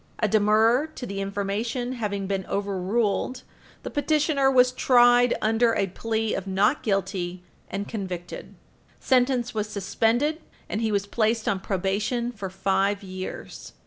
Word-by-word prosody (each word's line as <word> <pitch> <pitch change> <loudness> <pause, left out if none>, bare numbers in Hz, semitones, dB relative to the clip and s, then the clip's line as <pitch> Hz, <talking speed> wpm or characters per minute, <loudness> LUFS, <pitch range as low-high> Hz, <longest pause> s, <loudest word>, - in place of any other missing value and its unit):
A 215 - +1
demurrer 220 +6 +3
to 250 - -6
the 195 -3 -4
information 205 +5 -2
having 205 -5 -3
been 195 0 -2
overruled, 200 +5 -1 0.4
the - - -5
petitioner 295 -2 +2
was 250 -1 +5
tried 245 -1 +5
under 225 +1 +3
a 195 - +2
plea 220 +3 -2
of 195 - -4
not 200 +8 +2
guilty, 190 -3 -2 0.3
and 200 +1 -4
convicted. 185 -5 -6 0.4
Sentence 250 -2 +2
was 215 -1 -2
suspended, 230 - 0 0.3
and 215 - -3
he 220 -1 0
was 200 -1 0
placed 220 +1 0
on 195 - +1
probation 210 +6 -1
for 200 -5 -6
five 195 +1 0
years. 185 -1 -7
215 Hz, 140 wpm, -25 LUFS, 195-245 Hz, 0.4 s, was